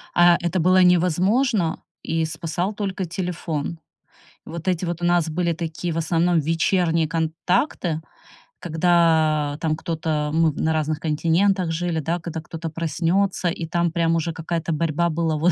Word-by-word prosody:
А 175 0 +6
это 175 +1 0
было 185 +3 +4
невозможно, 180 - +2 0.2
и 165 0 0
спасал 170 +5 -3
только 195 -2 -3
телефон. 170 -2 -4 0.7
Вот 170 +2 -7
эти 180 -1 0
вот 175 0 -4
у - - 0
нас 175 -2 +2
были 170 +1 0
такие, 165 0 -4
в - - -3
основном, 165 +1 +2
вечерние 165 +1 +1
контакты, 165 - -1 0.6
когда 160 -3 +2
там 155 -2 +1
кто-то 155 -3 -2
Мы 160 -1 +3
на 160 +2 0
разных 155 0 -1
континентах 170 +3 +1
жили, 170 0 -1
да, 165 +3 -2
когда 165 -1 -6
кто-то 165 +1 -6
проснется, 170 +4 0
и 165 0 -4
там 170 0 +1
прям 165 -1 +1
уже 165 0 -1
какая-то 165 0 -3
борьба 165 +2 0
была 160 -1 0
вот 175 +4 +3
165 Hz, 150 wpm, -22 LUFS, 160-175 Hz, 0.7 s, А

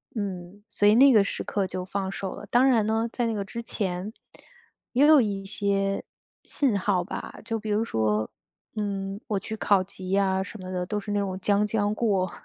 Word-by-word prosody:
嗯， 195 -1 -5
所 205 0 +3
以 210 - +6
那 275 +3 +7
个 210 - +6
时 200 - -4
刻 195 -2 -1
就 185 0 -4
放 195 0 -3
手 195 -1 -4
了。 - - -10
当 250 +3 +5
然 225 -5 +4
呢， 225 +1 +1
在 240 -1 -1
那 225 - -1
个 205 -2 -2
之 230 +4 -6
前， 190 -2 -3 0.8
也 265 +4 +5
有 305 -4 +8
一 200 -3 -2
些 195 0 0 0.4
信 255 -8 0
号 185 -2 +1
吧， - - -7
就 225 -1 -2
比 215 - -6
如 210 +2 +2
说， 110 - 0 0.4
嗯， 200 -2 -3
我 205 -2 0
去 220 +3 -6
考 200 -3 +3
级 185 -1 -9
呀 190 -1 +2
什 200 +1 -10
么 185 0 -7
的， 180 -1 -2
都 210 +2 -1
是 205 - -6
那 205 - +1
种 190 -2 -3
将 205 +1 +2
将 210 -1 0
过。 195 -6 +1
200 Hz, 220 characters per minute, -26 LUFS, 190-215 Hz, 0.8 s, 有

